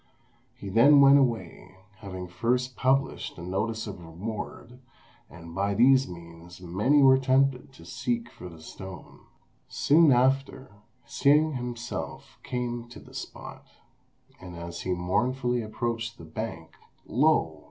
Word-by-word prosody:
He 100 - -8
then 120 +8 +6
went 140 0 +7
away, 95 -7 -2 0.2
having 95 -3 -7
first 125 +7 -1
published 135 +1 0
a 85 - -8
notice 110 +5 -2
of 100 -4 -7
reward, 110 +7 -7 0.5
and 85 -1 -12
by 100 +2 -1
these 130 +4 +5
means 85 0 -12
many 105 +12 +2
were 130 0 +6
tempted 135 0 +1
to 85 -11 -16
seek 115 +7 -3
for 90 - -10
the 80 -2 -14
stone. 95 +2 -10 0.5
Soon 155 +1 +4
after, 135 +1 +1 0.3
Hsing 150 +4 +3
himself 120 -2 -6
came 120 -1 -4
to 120 - -11
the - - -16
spot, - - -9 0.7
and 90 -1 -10
as 85 0 -7
he 95 - -1
mournfully 120 +7 0
approached 115 +1 -4
the 85 - -11
bank, 80 -1 -6 0.3
lo! - - +2
115 Hz, 130 wpm, -27 LUFS, 90-130 Hz, 0.7 s, went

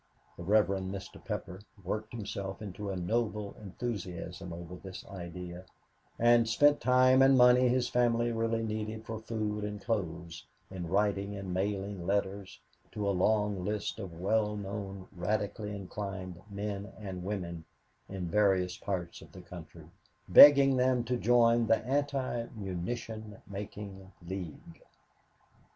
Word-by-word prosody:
The - - -10
Rev. 105 +4 +4
Mr. 95 0 -5
Pepper 90 +3 -5 0.2
worked 105 +4 -3
himself 100 -3 -5
into 105 0 -6
a 95 - -2
noble 105 +2 -1
enthusiasm 95 -4 -5
over 85 +1 -7
this 95 +1 -9
idea, 90 -1 -8 0.5
and 120 -1 +5
spent 145 +5 +4
time 130 +1 +5
and 135 0 +6
money 125 0 +7
his 125 0 +2
family 120 -1 +2
really 115 0 0
needed 110 0 -4
for 110 0 -5
food 110 -2 -3
and 105 0 -4
clothes 90 -6 -3 0.2
in 90 -3 -5
writing 100 +2 +1
and 95 -2 -5
mailing 95 -1 -2
letters 100 -1 -1 0.3
to 105 -1 -2
a - - +3
long 105 0 +1
list 105 +2 -2
of 90 -6 -7
well 105 +2 +1
known 100 -1 -6
radically 105 +3 -2
inclined 95 -2 -6
men 100 0 -4
and 95 -4 -6
women 90 -4 -4 0.5
in 95 -2 -4
various 95 -2 +2
parts 90 -4 -4
of - - -14
the - - -11
country, - - -11 0.4
begging 140 -2 +9
them 125 -1 +3
to 125 +1 -1
join 120 -1 +4
the 115 - +5
Anti 135 -3 -1
Munition 105 +3 -5
Making 100 -1 -7 0.2
League. 90 -4 -7
105 Hz, 135 wpm, -31 LUFS, 95-115 Hz, 0.5 s, begging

